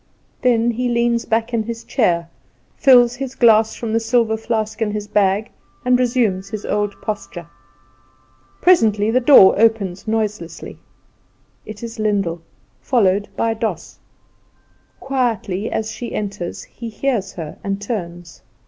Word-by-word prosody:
Then 240 -1 +2
he 245 +2 -2
leans 235 0 +1
back 225 +2 -1
in 230 - +1
his 230 +1 -6
chair, 170 -10 0 0.5
fills 245 -3 +5
his 265 -1 -5
glass 220 -2 +4
from 225 -2 -4
the 225 - +3
silver 225 -1 +1
flask 220 0 -3
in 220 - +1
his 210 0 -4
bag, 205 +1 +1 0.3
and 250 0 +3
resumes 230 -7 0
his 215 0 -6
old 205 -1 -2
posture. 205 -5 -5 1.2
Presently 220 - +4
the 250 - +3
door 250 -7 +7
opens 215 -4 +1
noiselessly. 215 -5 -3 0.9
It 215 +1 -9
is 230 0 -7
Lyndall, 195 -6 -1 0.4
followed 205 -5 +2
by 230 0 +1
Doss. 225 0 -4 1.0
Quietly 230 -7 -2
as 220 0 -2
she 240 - -6
enters, 200 -4 -5
he 230 -1 -9
hears 220 -4 -2
her, 160 -4 -8
and 195 0 -2
turns. 175 -6 -6
220 Hz, 135 wpm, -19 LUFS, 200-235 Hz, 1.2 s, door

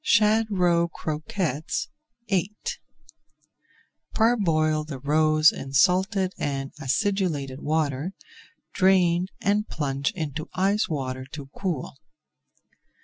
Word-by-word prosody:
SHAD 215 +1 +4
ROE 175 -4 +2
CROQUETTES 155 - -3 0.4
VIII 195 +1 0 1.6
Parboil 165 -10 +2
the 150 -3 -7
roes 155 +3 +4
in 135 0 -8
salted 185 +4 +3
and 135 -1 -2
acidulated 150 -4 -1
water, 155 +2 -1 0.6
drain, 185 -2 +3 0.2
and 210 +1 +1
plunge 140 -2 -1
into 155 -3 -4
ice 195 +2 +1
water 130 -4 -3
to 140 -2 -8
cool. 165 -8 -3
160 Hz, 90 wpm, -25 LUFS, 145-195 Hz, 1.6 s, SHAD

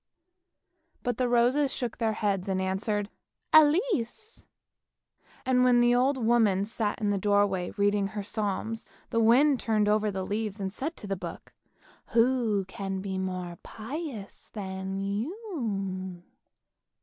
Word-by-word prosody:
" 335 -2 -45
But 245 -2 -1
the 250 -1 +1
roses 250 +4 +3
shook 240 -3 -3
their 225 -2 +1
heads 200 -3 -1
and 190 -1 0
answered, 200 +2 -1 0.3
" - - -40
Elise! 315 - +3 0.5
" - - -31
And 250 -1 +3
when 250 -1 +5
the 240 0 +5
old 260 +3 +3
woman 225 -5 +3
sat 215 -1 -2
in 210 -2 +1
the 200 - 0
doorway 200 -2 +2
reading 205 0 +2
her 205 0 -5
Psalms, 215 +2 -2 0.2
the 230 - +2
wind 255 +5 +5
turned 215 -2 +1
over 210 0 +2
the 190 -2 -3
leaves 210 0 -3
and 190 -1 -3
said 310 +9 -4
to - - -9
the 195 -1 -2
book, 185 - -8 0.3
" - - -28
Who 230 -4 +3
can 195 0 -4
be 190 -1 -3
more 180 -2 -4
pious 235 -2 -7
than 190 -1 -4
you?" 200 - -3
215 Hz, 150 wpm, -28 LUFS, 195-245 Hz, 0.5 s, when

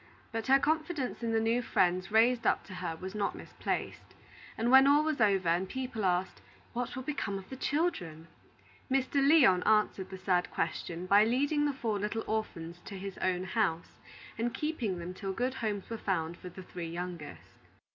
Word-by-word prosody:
But 225 -1 -3
her 270 +1 +7
confidence 310 -2 -1
in 230 -1 -1
the 225 - +2
new 230 +2 +1
friends 185 -4 +1
raised 230 +2 +4
up - - +2
to 185 - -11
her 175 -3 -4
was 185 +3 -7
not 205 -2 -1
misplaced; - - -5 0.4
and 230 +2 +1
when 265 +1 +8
all 290 +2 +5
was 310 -5 -1
over, 195 -5 +3
and 180 +3 +1
people 255 -5 -3
asked, 180 0 0 0.3
"What 245 0 -3
will 260 - -5
become 220 -8 -2
of 190 -1 -9
the - - -4
children?" 260 - -1 0.6
Mr. 270 +1 +1
Lyon 275 - +6
answered 210 -3 +2
the 190 - -7
sad 185 -1 +1
question 170 +1 -3
by 200 +3 +6
leading 285 +6 +2
the 290 - +1
four 225 -6 -2
little 210 +2 -2
orphans 175 -6 -3
to 195 - -7
his 195 0 -7
own 185 -1 0
house, 190 -4 -1 0.4
and 235 +1 -1
keeping 260 - -2
them 175 +1 -6
till 195 0 -4
good 250 +5 -1
homes 215 -6 -3
were 230 -1 -5
found 170 -4 -1
for 180 - -9
the 185 +2 -10
three 175 -2 -6
youngest. 175 -2 -7
210 Hz, 185 wpm, -31 LUFS, 185-255 Hz, 0.6 s, when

